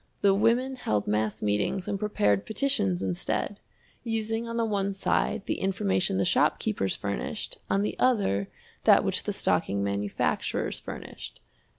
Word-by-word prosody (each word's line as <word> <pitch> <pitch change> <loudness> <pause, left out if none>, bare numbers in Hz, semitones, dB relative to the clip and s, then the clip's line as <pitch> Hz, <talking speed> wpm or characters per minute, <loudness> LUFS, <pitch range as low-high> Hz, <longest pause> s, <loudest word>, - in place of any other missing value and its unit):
The 200 -1 +5
women 235 +6 +2
held 105 - 0
mass 105 0 -1
meetings 105 - 0
and 200 -1 -2
prepared 105 - +2
petitions 100 - 0
instead, 95 - -2 0.4
using 225 0 -2
on 230 0 -4
the 230 - +2
one 200 -2 0
side 195 0 0
the - - -2
information 95 - +1
the 95 - +2
shopkeepers 95 +1 +1
furnished, 100 - -4
on 195 +1 +2
the - - -2
other 195 - +2 0.4
that - - +7
which - - 0
the - - 0
stocking 100 0 +1
manufacturers 100 0 -1
furnished. - - -8
195 Hz, 145 wpm, -28 LUFS, -, 0.4 s, that